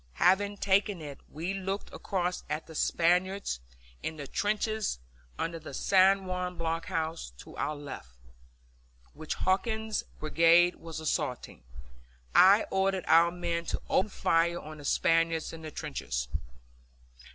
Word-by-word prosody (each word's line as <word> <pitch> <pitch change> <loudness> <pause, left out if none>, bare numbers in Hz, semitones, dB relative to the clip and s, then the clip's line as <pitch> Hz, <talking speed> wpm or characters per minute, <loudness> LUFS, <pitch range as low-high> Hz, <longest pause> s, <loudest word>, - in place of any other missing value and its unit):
Having 200 - +3
taken 200 -1 +2
it, 145 -3 -8
we 165 +6 -4
looked 195 +1 -4
across 180 -2 -2
at 150 +2 -2
the 160 - -12
Spaniards 180 - +1 0.4
in 160 - -4
the 145 - -6
trenches 215 - -1 0.4
under 165 0 -3
the 155 -3 -8
San 195 0 +4
Juan 180 -1 -3
blockhouse 165 - -2
to - - -12
our 150 - -1
left, 140 - -9 1.0
which 155 0 -4
Hawkins's 220 +3 0 0.2
brigade 165 +3 +4
was 165 -1 -7
assaulting. 125 - -3 0.7
I 195 +4 +7
ordered 190 -1 +1
our 165 +1 +6
men 170 -1 -2
to - - -3
open 190 - +3
fire 170 -2 +1
on 155 0 -10
the 145 - -10
Spaniards 165 0 +2
in 165 - -8
the 155 - -6
trenches. 135 - -4
170 Hz, 130 wpm, -30 LUFS, 160-190 Hz, 1.0 s, I